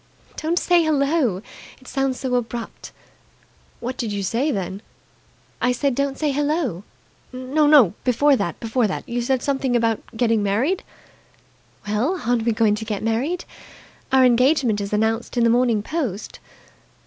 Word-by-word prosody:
"Don't 330 +3 -1
say 350 -1 +3
'Hello!' 280 - +1 0.4
It 260 - -18
sounds 270 -1 -1
so 260 -2 -3
abrupt!" 235 -1 -4 0.9
"What 250 +2 -5
did 230 -4 -3
you 200 -1 -3
say 235 +10 0
then?" 195 -5 -3 0.8
"I 250 - +2
said 275 +2 0
'Don't 280 +1 -1
say 300 -2 0
Hello!'" 285 - -1 0.5
"No, 265 - +4
before 275 +3 +3
that! 200 -8 -3
Before 230 0 0
that! 190 - -5
You 240 +1 -2
said 260 +1 0
something 270 -3 0
about 230 -2 +1 0.2
getting 230 -3 +2
married." 235 - 0 1.1
"Well, 245 - 0
aren't 235 -1 +1
we 235 - +3
going 215 -1 +2
to 210 +1 -3
get 215 -2 -4
married? 260 +11 -1 0.7
Our 265 -1 +5
engagement 250 -3 +3
is 200 - -5
announced 220 +3 -1
in 240 - +3
the 230 - +4
Morning 235 -3 +2
Post." 255 - -4
245 Hz, 150 wpm, -22 LUFS, 220-280 Hz, 1.1 s, Our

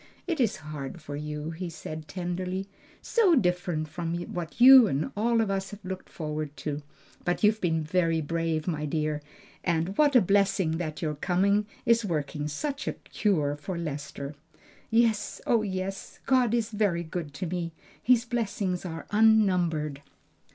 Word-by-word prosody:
"It 335 -4 -2
is 230 -5 +2
hard 150 +1 -6
for 150 -2 -7
you," 150 +1 -4
he 175 +2 -5
said 155 -1 -7
tenderly; 180 +3 -3 0.4
"so 410 -8 +4
different 180 - 0
from 170 +2 -3 0.2
what 175 +4 -5
you 255 -1 +10
and 145 -3 -1
all 230 +2 +2
of 210 -3 0
us 195 -1 -2
have 205 -2 -11
looked 185 0 -6
forward 150 -2 -4
to. 150 -1 -3 0.4
But 175 +3 -1
you 210 - +7
have 220 - -11
been 160 -3 +1
very 165 0 +1
brave, 160 0 -1 0.2
dear; 150 -1 -1 0.4
and 170 +2 0
what 290 -2 +5
a - - +10
blessing 195 -4 +2
that 160 0 -4
your 155 -1 0
coming 195 +6 +1 0.2
is 230 0 +4
working 150 -5 -2
such 280 - -3
a - - 0
cure 155 -9 0
for 150 +5 -5
Lester!" 145 -3 -5 0.6
"Yes, 225 -2 +2
oh 230 -2 +3
yes! 195 -1 -4
God 250 -3 +3
is 230 -1 -1
very 200 -5 +1
good 160 -2 -5
to 185 - -3
me, 170 -1 -3 0.3
His 245 -1 +4
blessings 205 -6 -2
are 165 -3 -6
unnumbered!" 180 -9 +3
180 Hz, 160 wpm, -28 LUFS, 155-210 Hz, 0.6 s, you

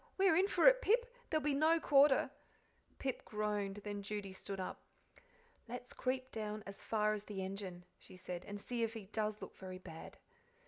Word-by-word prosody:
We're 380 -4 +5
in 375 +4 +5
for 355 -4 +2
it - - +10
now, - - -12
Pip 485 +3 +3 0.2
there'll 310 -1 +1
be 295 -1 +2
no 315 +4 +4
quarter." 280 -3 +5 0.7
Pip 265 -1 -2
groaned; 210 -2 -2
then 205 -1 -3
Judy 200 -1 -4
stood 195 +1 -6
up. 185 - -4 0.9
"Let's 245 +1 -6
creep 255 0 -1
down 215 -1 -4
as 200 0 -8
far 215 -1 +2
as 210 -1 -4
the 195 -2 -4
engine," 190 -2 -5
she 185 - -14
said, 180 -1 -5
"and 205 0 -6
see 240 +3 -3
if 225 0 0
he 220 -3 -6
does 215 +1 -2
look - - -8
very 185 -1 -7
bad." 165 -3 -10
215 Hz, 190 wpm, -37 LUFS, 195-270 Hz, 0.9 s, it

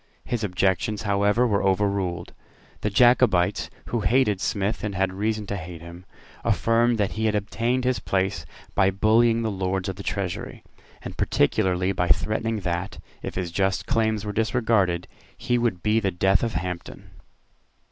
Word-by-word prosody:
His 120 -3 -2
objections 95 +2 0
however 105 +3 +2
were 105 -4 +1
overruled. 95 -2 0 0.5
The 105 - -1
Jacobites, 110 -5 +3 0.2
who 120 - 0
hated 110 -3 +2
Smith 100 +2 -1
and 105 -2 -3
had 95 0 0
reason 105 +2 -2
to 100 - -4
hate 85 -2 -8
him, 85 +2 -11 0.4
affirmed 115 +1 +2
that 105 -2 0
he 110 +1 -2
had 110 -1 +1
obtained 115 +5 -1
his 125 -4 +1
place 95 -1 -1 0.3
by 95 -1 +3
bullying 115 +4 +3
the 110 - -1
Lords 95 -1 -2
of 95 - -5
the - - -6
Treasury, 95 -2 -4 0.4
and - - -7
particularly 90 +5 +1
by 90 -2 -1
threatening 110 +3 0
that, 90 +2 -3 0.2
if - - -6
his 90 -2 -3
just 95 +2 0
claims 110 -4 0
were 105 - -3
disregarded, 110 -6 +1 0.3
he 120 0 0
would 115 -7 -1
be 110 +1 +3
the 100 -3 0
death 95 +1 +2
of 115 - -1
Hampden. 90 0 -5
100 Hz, 160 wpm, -24 LUFS, 95-110 Hz, 0.5 s, Jacobites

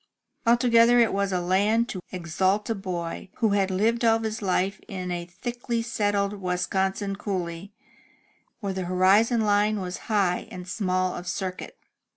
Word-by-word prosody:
Altogether 235 0 +5
it 230 -2 +3
was 200 0 0
a 180 - +1
land 205 +6 +2
to 185 - -5
exalt 185 +3 0
a - - +3
boy 185 -4 -5
who 225 -3 +1
had 200 -1 +2
lived 225 +6 +1
all 225 -1 +5
his 220 -1 -4
life 190 0 0
in 185 -2 -5
a 175 -1 -4
thickly 235 +4 -3
settled 205 -3 0
Wisconsin 190 +2 -1
coolly, 185 -2 -4 0.9
where 200 -2 -2
the 190 -1 -3
horizon 195 +6 +3
line 210 0 +2
was 180 -1 -4
high 195 -5 +1
and 180 -1 -8
small 185 -1 0
of 175 - -7
circuit. 185 0 -4
195 Hz, 155 wpm, -26 LUFS, 185-220 Hz, 0.9 s, Altogether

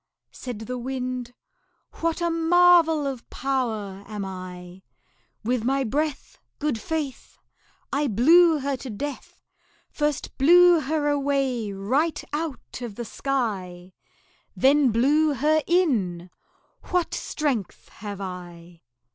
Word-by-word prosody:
Said 245 -4 -7
the 250 +3 -5
Wind 250 -1 -4 0.7
"What 330 +1 0
a 340 0 +1
marvel 330 -2 +4
of 265 -4 -5
power 220 -7 -2
am 210 -2 -5
I! 185 -1 -8 0.6
With 240 0 0
my 270 +3 +1
breath, 290 +4 -3 0.2
Good 295 -6 -1
faith! 300 -1 -4 0.6
I 285 +1 +1
blew 320 - +5
her 280 0 -1
to 255 - -8
death 280 +6 -7 0.5
First 295 -2 -2
blew 350 +4 +7
her 300 +1 -1
away 275 -6 0
right 260 +12 0
out 300 -5 -5
of 235 -4 -6
the 235 - -5
sky 190 -10 -3 0.6
Then 275 0 +4
blew 285 +6 +3
her 310 +4 +2
in; 205 - +1 0.6
what 360 -2 0
strength 265 - -3
have 205 -1 -8
I!" 175 -3 -9
265 Hz, 115 wpm, -25 LUFS, 210-300 Hz, 0.7 s, blew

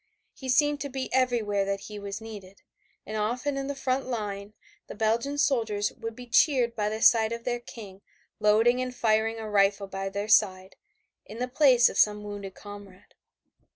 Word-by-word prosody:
He 265 - -8
seemed 290 +3 +2
to 285 - -4
be 260 -1 -5
everywhere 235 -6 +1
that 195 0 -2
he 210 0 -8
was 200 +1 -6
needed, 200 -4 -11 0.4
and 215 - -6
often 245 +7 -1
in 275 0 -3
the 280 - -3
front 265 0 -2
line 205 -4 -4 0.3
the - - -9
Belgian 230 +7 0
soldiers 225 -8 +1
would 225 0 -7
be 250 - -10
cheered 240 -1 +3
by 210 -2 -1
the 220 +2 -3
sight 225 -1 +5
of 235 0 -5
their 240 0 -2
King 205 -5 -11 0.4
loading 225 +4 +3
and 255 0 -4
firing 220 0 +1
a 220 -1 -6
rifle 200 -1 +2
by 195 0 -5
their 200 +2 -4
side, 190 -3 +2 0.5
in 220 - -9
the 250 +1 -2
place 255 -2 +5
of - - -3
some 210 0 +3
wounded 205 -2 -7
comrade. 205 -2 -12
220 Hz, 185 wpm, -27 LUFS, 205-250 Hz, 0.5 s, sight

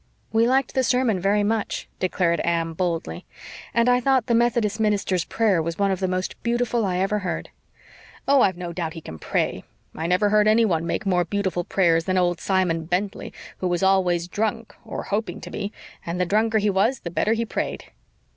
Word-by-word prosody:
"We 225 +1 +4
liked 260 0 +1
the 260 - +2
sermon 250 -5 +2
very 200 +3 +2
much," 215 0 -1
declared 180 -2 +1
Anne 165 -1 0
boldly. 165 - -3 0.5
"And 235 +2 +2
I 250 0 +4
thought 260 -2 +2
the 240 - 0
Methodist 230 -2 +1
minster's 200 -5 +1
prayer 210 -7 +1
was 165 +1 -4
one 200 -1 +2
of 190 - -1
the 190 - 0
most 185 0 -3
beautiful 235 -2 0
I 180 -1 -1
ever 195 +3 0
heard." 185 -3 -4 0.8
"Oh, 275 -1 +5
I've 185 -5 +2
no 175 -1 -5
doubt 165 -2 -3
he 165 - -8
can 80 - -9
pray. - - -1 0.3
I 160 - -3
never 185 +4 +2
heard 210 0 +4
anyone 215 -7 +3
make 210 - -2
more 180 -2 +2
beautiful 190 -1 -2
prayers 165 -3 +2
than 185 -1 0
old 175 -1 +1
Simon 180 -4 0
Bentley, 190 +5 -2 0.3
who 185 - -1
was 175 +1 0
always 180 -3 +2
drunk, 220 +3 -2
or - - -6
hoping 215 +2 -3
to - - -9
be, 205 -1 -4 0.3
and 170 +1 -4
the 180 - +2
drunker 220 +4 +2
he 210 -1 +2
was 215 +7 +1
the 170 - -6
better 215 +5 +1
he 230 0 -1
prayed." - - -4
195 Hz, 200 wpm, -23 LUFS, 175-220 Hz, 0.8 s, Oh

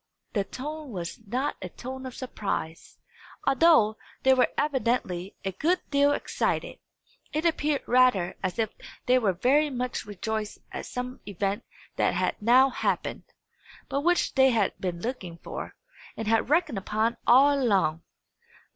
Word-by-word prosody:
The 200 - +1
tone 300 +5 -6
was 175 -6 -5
not 260 +7 -1
a 185 - -5
tone 260 +6 -7
of 255 - -9
surprise, 195 -9 -4 0.5
although 270 -7 +5 0.3
they 265 - +6
were 255 -1 +4
evidently 235 -10 -1
a 195 - 0
good 335 - +1
deal 285 0 +4
excited; - - -2 0.5
it 310 +2 -1
appeared 300 -3 +1
rather 245 -8 +3
as 185 -2 -2
if 220 -2 0 0.3
they 255 +1 +4
were 215 -5 +2
very 275 - +3
much 250 -4 -3
rejoiced 210 +1 -4
at - - -6
some 250 0 -5
event 200 +2 -2 0.3
that - - +2
had - - -1
now 255 +5 +5
happened, - - -2 0.6
but 280 - 0
which 350 +3 +2
they 265 -1 +5
had 220 -6 +2
been 175 -2 -3
looking 195 -9 -4
for, - - -7 0.4
and 225 - -4
had 225 +2 +2
reckoned 305 - +2
upon 220 +4 0
all 275 +4 +7
along. 190 -9 +2
245 Hz, 145 wpm, -27 LUFS, 200-270 Hz, 0.6 s, all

